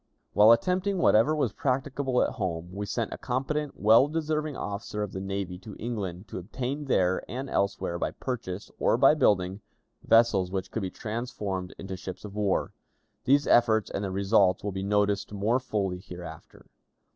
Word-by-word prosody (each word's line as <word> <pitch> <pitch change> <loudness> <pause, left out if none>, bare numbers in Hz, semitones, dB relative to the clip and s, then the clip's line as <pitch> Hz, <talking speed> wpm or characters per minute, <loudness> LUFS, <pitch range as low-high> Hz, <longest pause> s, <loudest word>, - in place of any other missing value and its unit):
While 105 +2 +7
attempting 185 - +2
whatever 120 -2 +4
was 130 -9 0
practicable 135 -1 0
at - - -1
home, 90 -4 -4
we 100 +1 -4
sent 115 +2 -2
a - - -8
competent, 140 +3 -2
well 110 +6 +6
deserving 155 -2 -2
officer 105 +1 -4
of 105 - -5
the 95 - -5
navy 95 -2 -4
to 105 +1 -10
England 105 -5 -4
to - - -5
obtain 130 +9 -4
there 95 -8 +2
and 130 +6 -4
elsewhere, 100 -6 -1
by - - 0
purchase 110 -7 -5
or - - +3
by - - +6
building, 95 0 +2 0.4
vessels 115 -5 +4
which 95 0 -4
could 110 - -2
be 95 - -2
transformed 105 -4 -4
into 95 -1 -6
ships 95 +2 -8
of 100 - -8
war. 105 -2 0 0.5
These 140 +2 +4
efforts 110 -3 +3
and 100 - -3
their 100 - -2
results 95 -1 +2
will 100 - -2
be 95 0 -4
noticed 105 0 0
more 105 +5 +1
fully 100 -7 -2
hereafter. 90 -3 -11
105 Hz, 170 wpm, -28 LUFS, 95-125 Hz, 0.5 s, While